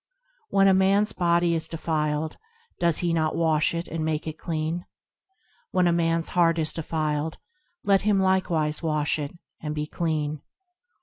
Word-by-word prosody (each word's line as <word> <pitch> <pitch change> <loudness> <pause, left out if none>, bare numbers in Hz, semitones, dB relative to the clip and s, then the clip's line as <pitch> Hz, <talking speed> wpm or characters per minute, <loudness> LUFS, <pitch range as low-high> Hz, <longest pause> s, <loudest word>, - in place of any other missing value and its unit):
When 195 0 +4
a 195 - +6
man's 195 +3 +3
body 170 -1 +2
is 160 -1 -1
defiled, 155 -1 -2 0.4
does 170 -2 +2
he 170 - +1
not 155 -1 +1
wash 160 0 +2
it 170 0 -3
and 160 0 -3
make 155 -1 -1
it 155 0 -6
clean? 165 +1 -3 0.8
When 185 -1 +2
a - - +4
man's 165 -1 +1
heart 170 -2 +3
is 155 -1 0
defiled, 155 -1 -2 0.5
let 195 -1 +4
him 205 -1 +2
likewise 175 -5 +1
wash 155 -2 0
it, 145 +3 -5 0.2
and 150 -1 -4
be 150 0 -2
clean. 155 -2 -2
165 Hz, 160 wpm, -25 LUFS, 155-175 Hz, 0.8 s, a